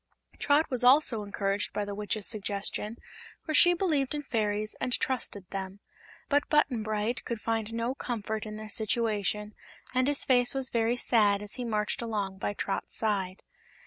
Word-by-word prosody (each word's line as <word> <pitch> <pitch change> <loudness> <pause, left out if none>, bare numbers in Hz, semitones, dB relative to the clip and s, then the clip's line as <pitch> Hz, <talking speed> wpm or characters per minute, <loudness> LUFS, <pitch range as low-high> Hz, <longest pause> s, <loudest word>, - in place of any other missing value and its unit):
Trot 295 +2 +3
was 250 -1 +1
also 250 -3 +5
encouraged 200 0 -2
by 205 - -1
the 200 - -5
Witch's 210 0 -2
suggestion, 210 +1 -3 0.5
for 310 - -2
she 350 +3 +8
believed 305 -7 0
in 295 - -3
fairies 215 -4 -1
and 250 - -1
trusted 210 -7 -2
them; 195 0 -5 0.5
but 290 -1 +1
Button 280 -6 +2
Bright 215 +2 -2
could 235 -2 -4
find 225 -1 -2
no 230 +2 -1
comfort 220 -4 -4
in 215 - -6
their 215 0 -7
situation 210 -1 -1 0.4
and 255 0 +2
his 290 0 +2
face 245 0 +3
was 265 -2 0
very 230 +1 +1
sad 210 -4 +3
as 205 - -6
he 250 - -5
marched 210 -2 -1
along 205 -4 -3
by 205 - -2
Trot's 195 - -3
side. 195 -4 -1
220 Hz, 170 wpm, -29 LUFS, 205-250 Hz, 0.5 s, she